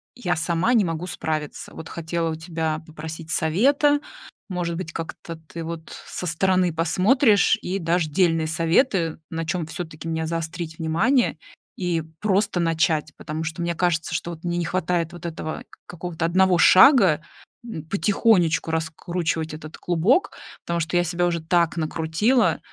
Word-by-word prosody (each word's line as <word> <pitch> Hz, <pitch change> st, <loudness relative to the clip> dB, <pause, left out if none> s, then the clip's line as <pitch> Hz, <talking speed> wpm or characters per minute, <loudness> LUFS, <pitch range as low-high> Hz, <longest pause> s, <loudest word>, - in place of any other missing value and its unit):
я 180 Hz, -8 st, -1 dB
сама 170 Hz, +7 st, +1 dB
не 225 Hz, -4 st, +5 dB
могу 165 Hz, 0 st, -3 dB
справиться. 155 Hz, -4 st, -4 dB
Вот 160 Hz, -, -8 dB
хотела 165 Hz, 0 st, -2 dB
у -, -, -3 dB
тебя 160 Hz, -1 st, -3 dB
попросить 160 Hz, +1 st, -8 dB
совета, 275 Hz, -, +3 dB, 0.5 s
может 175 Hz, -2 st, -2 dB
быть 165 Hz, -1 st, -5 dB
как-то 165 Hz, 0 st, -6 dB
ты 165 Hz, +1 st, -9 dB
вот 165 Hz, 0 st, -7 dB
со -, -, -5 dB
стороны 180 Hz, +1 st, +2 dB
посмотришь 200 Hz, -, +3 dB
и 190 Hz, +2 st, -2 dB
дашь 170 Hz, -1 st, +1 dB
дельные 165 Hz, 0 st, +2 dB
советы. 165 Hz, -, +1 dB
На 165 Hz, 0 st, -3 dB
чем 170 Hz, 0 st, -2 dB
всё-таки 165 Hz, -1 st, -7 dB
мне 160 Hz, 0 st, -1 dB
заострить 165 Hz, 0 st, -4 dB
внимание 200 Hz, -, +2 dB, 0.4 s
и 175 Hz, -3 st, 0 dB, 0.2 s
просто 200 Hz, -2 st, +1 dB
начать. 160 Hz, -2 st, +1 dB
Потому 155 Hz, +1 st, -5 dB
что 160 Hz, +2 st, -4 dB
мне 170 Hz, 0 st, -1 dB
кажется, 165 Hz, -2 st, 0 dB
что 170 Hz, 0 st, -4 dB
мне 175 Hz, 0 st, -1 dB
не 175 Hz, -, -1 dB
хватает 175 Hz, -1 st, -1 dB
вот 175 Hz, 0 st, -10 dB
этого 155 Hz, -1 st, -5 dB, 0.2 s
какого-то 175 Hz, -1 st, -4 dB
одного 185 Hz, +1 st, +3 dB
шага, 185 Hz, -, +7 dB, 0.4 s
м, 185 Hz, -10 st, -7 dB
потихонечку 195 Hz, -3 st, +2 dB
раскручивать 160 Hz, 0 st, -2 dB
этот 155 Hz, +1 st, -9 dB
клубок. 180 Hz, -, +2 dB, 0.3 s
Потому 170 Hz, 0 st, -1 dB
что 175 Hz, +2 st, 0 dB
я 175 Hz, -, +3 dB
себя 175 Hz, +1 st, 0 dB
уже 170 Hz, -1 st, -1 dB
так 170 Hz, +1 st, +1 dB
накрутила, 165 Hz, +10 st, +1 dB
170 Hz, 150 wpm, -23 LUFS, 160-180 Hz, 0.5 s, шага